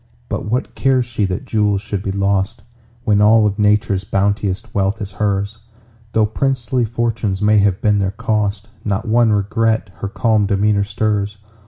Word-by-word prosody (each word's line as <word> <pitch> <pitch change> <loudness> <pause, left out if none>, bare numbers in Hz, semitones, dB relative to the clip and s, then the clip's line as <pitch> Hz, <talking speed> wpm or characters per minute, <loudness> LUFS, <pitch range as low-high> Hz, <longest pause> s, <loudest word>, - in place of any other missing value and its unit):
But - - -3
what 120 +5 -2
cares 130 -2 +2
she 115 -4 -1
that 95 +7 -3
jewels 105 -4 +1
should 100 -1 -4
be 100 - -3
lost, 100 0 -1 0.4
When 105 -4 +3
all 110 +1 +5
of 105 0 -1
Nature's 105 -2 +2
bounteous 100 +1 0
wealth 100 +2 0
is 100 -2 -5
hers? 100 +2 -2 0.5
Though 110 -1 +3
princely 125 +2 0
fortunes 115 -3 -1
may 105 0 +4
have 100 -2 +1
been 105 -1 +3
their 95 -1 +1
cost, 105 -1 -2 0.2
Not 100 +1 -2
one 115 0 +3
regret 110 0 0
her - - -4
calm 105 +1 +1
demeanor 100 0 +2
stirs. 105 0 -1
105 Hz, 165 wpm, -18 LUFS, 100-110 Hz, 0.5 s, all